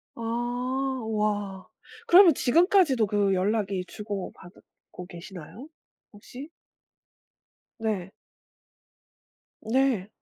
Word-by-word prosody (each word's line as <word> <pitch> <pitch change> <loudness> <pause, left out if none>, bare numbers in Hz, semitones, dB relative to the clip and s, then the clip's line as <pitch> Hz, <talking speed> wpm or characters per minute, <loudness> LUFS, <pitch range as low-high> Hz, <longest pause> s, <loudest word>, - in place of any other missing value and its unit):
아. 235 - -9 0.9
와 205 -3 -2 0.4
그러면 355 -2 +8
지금까지도 315 - +3
그 200 -2 +1
연락이 195 -1 -1
주고받고 190 -3 -9
계시나요, 185 - -10 0.5
혹시? 250 +8 -11 1.3
네. 200 -4 -3 1.5
네. 235 -4 +1
210 Hz, 155 characters per minute, -26 LUFS, 195-255 Hz, 1.5 s, 그러면